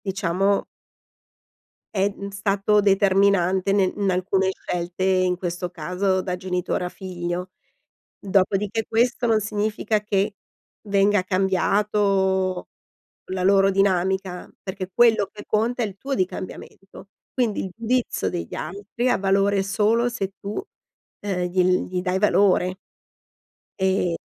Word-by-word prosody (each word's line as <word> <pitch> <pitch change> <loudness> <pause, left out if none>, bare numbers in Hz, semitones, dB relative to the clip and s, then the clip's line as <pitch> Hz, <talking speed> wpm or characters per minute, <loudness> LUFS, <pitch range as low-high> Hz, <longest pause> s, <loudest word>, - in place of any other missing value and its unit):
diciamo 195 0 0 1.3
è, 195 0 +2
mhmm, 200 0 -7
stato 200 +1 +1
determinante 195 -1 +3
nel 190 -2 +2
in 200 -2 0
alcune 190 +1 +1
scelte, 180 0 -4
in 185 -1 +2
questo 175 0 -3
caso 180 +3 -1
da 180 -1 -3
genitore 180 -1 -2
a - - -2
figlio. 180 -1 -5 0.7
Dopodiché 200 +3 +1
questo 240 +1 +1
non 220 - +4
significa 210 +1 -1
che 205 0 0 0.5
venga 200 0 +3
cambiato 190 0 +1 0.6
la 185 -1 -2
loro 195 +1 +5
dinamica, 190 -1 0
perché 190 -1 -5
quello 225 -3 +4
che 205 - -11
conta 235 +3 0
è - - +1
il 200 -2 -8
tuo 270 +5 -3
di 185 - +2
cambiamento. 195 +1 -10 0.2
Quindi 230 -6 0
il - - -5
giudizio 230 - -1
degli 85 -1 -5
altri 205 +8 -3
ha - - +3
valore 195 +1 +2
solo 215 +4 +2
se 205 -6 -3
tu, 200 - -6 0.7
uhm, 195 -3 -2
gli 180 +1 +2 0.3
gli 180 0 -2
dai 185 0 0
valore. 190 -2 +3 1.0
E 190 -3 +1
195 Hz, 125 wpm, -23 LUFS, 185-205 Hz, 1.3 s, loro